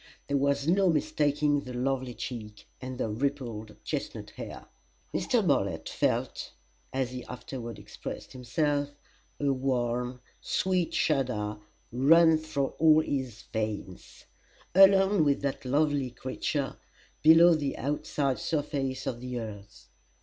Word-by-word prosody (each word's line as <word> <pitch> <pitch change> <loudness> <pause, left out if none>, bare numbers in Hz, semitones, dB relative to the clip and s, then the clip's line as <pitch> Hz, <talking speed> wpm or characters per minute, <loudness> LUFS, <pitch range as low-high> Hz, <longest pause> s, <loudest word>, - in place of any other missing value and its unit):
There 140 - +1
was 140 +1 +1
no 190 +2 +4
mistaking 150 -1 +2
the 125 -3 -8
lovely 130 -1 -1
cheek 105 -4 -7 0.2
and 130 0 -6
the 125 - -1
rippled 115 -3 -3
chestnut - - -4
hair. - - -8 0.5
Mr. - - +1
Bartlett - - +1
felt - - -1 0.4
as 130 -2 -1
he 125 -1 -6
afterward 125 -2 -7
expressed - - -8
himself 145 +3 0 0.5
a 140 -1 +2
warm, 125 -1 -1 0.2
sweet 185 -2 0
shudder 115 -8 0 0.3
run 160 +6 +5
through 145 -3 -2
all 155 -1 +6
his 130 -7 -3
veins. 105 -4 -5 0.5
Alone 195 -1 +6
with 140 -1 +1
that 140 -1 -2
lovely 145 0 +1
creature, 130 +3 -3 0.4
below 165 +2 +8
the 145 -3 -1
outside 140 -2 -1
surface 135 -2 -2
of 120 -1 -3
the 125 -1 -4
earth! 105 -3 -9
135 Hz, 120 wpm, -29 LUFS, 125-150 Hz, 0.5 s, below